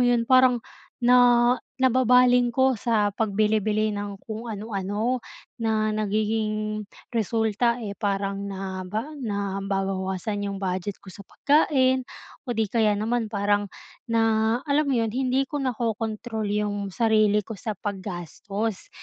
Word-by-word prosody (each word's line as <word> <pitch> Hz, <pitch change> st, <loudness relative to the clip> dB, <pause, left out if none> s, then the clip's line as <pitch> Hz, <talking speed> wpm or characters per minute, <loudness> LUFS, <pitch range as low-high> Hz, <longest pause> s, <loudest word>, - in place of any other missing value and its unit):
'yon, 235 Hz, -1 st, +2 dB
parang 255 Hz, -1 st, +4 dB, 0.4 s
na 245 Hz, 0 st, +6 dB, 0.2 s
nababaling 250 Hz, -1 st, +4 dB
ko 260 Hz, -3 st, +3 dB
sa 215 Hz, -4 st, +2 dB
pagbili-bili 215 Hz, 0 st, +1 dB
ng 205 Hz, -1 st, -4 dB
kung 220 Hz, +1 st, -6 dB
ano-ano 215 Hz, +3 st, -2 dB, 0.4 s
na 220 Hz, -1 st, +1 dB
nagiging 215 Hz, 0 st, -1 dB, 0.3 s
resulta, 225 Hz, +1 st, +1 dB
eh, 205 Hz, -, -4 dB
parang 200 Hz, -1 st, -2 dB
naba 195 Hz, +6 st, -4 dB
nababawasan 195 Hz, -3 st, -2 dB
'yong 200 Hz, -, -4 dB
budget 190 Hz, +1 st, -3 dB
ko 190 Hz, -, -11 dB
sa 200 Hz, -, -12 dB
pagkain 260 Hz, -3 st, +2 dB, 0.4 s
o 240 Hz, -, -2 dB
'di 225 Hz, -, +2 dB
kaya 215 Hz, -3 st, +3 dB
naman 225 Hz, +2 st, -1 dB
parang 205 Hz, 0 st, 0 dB, 0.4 s
na 230 Hz, 0 st, +2 dB, 0.4 s
alam 295 Hz, 0 st, +1 dB
'yon, 230 Hz, -5 st, +1 dB
hindi 260 Hz, +2 st, +1 dB
ko 290 Hz, +2 st, -4 dB
nako-control 225 Hz, -3 st, -2 dB
'yong 205 Hz, -1 st, -1 dB
sarili 215 Hz, 0 st, +2 dB
ko 225 Hz, -, -7 dB
sa 215 Hz, +2 st, -4 dB
paggastos, 195 Hz, +2 st, -5 dB
215 Hz, 120 wpm, -25 LUFS, 200-240 Hz, 0.4 s, na